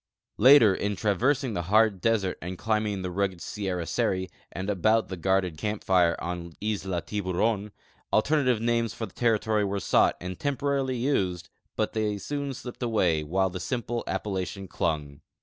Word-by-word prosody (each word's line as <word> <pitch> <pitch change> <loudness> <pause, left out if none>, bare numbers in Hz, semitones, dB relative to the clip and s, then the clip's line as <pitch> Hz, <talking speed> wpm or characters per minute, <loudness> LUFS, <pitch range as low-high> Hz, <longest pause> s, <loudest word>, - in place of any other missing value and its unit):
Later, 120 -3 +8
in 100 +2 -2
traversing 125 +6 +1
the 85 - -1
hard 105 -3 +4
desert 110 -5 +1
and 90 +1 -5
climb 110 0 0
ing 100 -2 -3
the 90 - -3
rugged 95 -1 -1
Sierra 95 -3 -3
Seri, 95 +2 -1 0.2
and 95 +2 -5
about 110 +3 +2
the 95 - -4
guarded 90 -2 0
camj) 105 0 -3
lire 90 -3 +4
on 85 -1 -5
Isla 95 -4 -2
Tihuron, 105 +1 -1 0.4
alternative 130 0 +2
names 115 -1 0
for 115 - -3
the 95 - -14
territory 110 -2 +1
were 100 0 -1
sought - - +3
and 90 0 -6
temporarily 140 -2 -1
used, 95 - -1 0.3
hut - - 0
they 105 -2 0
soon 140 +7 -4
slijiped 130 -2 -8
away, 90 -10 +1
while 95 +4 0
the 90 - -5
simple 120 +2 -3
appellation 95 -1 -3
clung. 75 -5 -2
100 Hz, 165 wpm, -27 LUFS, 90-115 Hz, 0.4 s, Later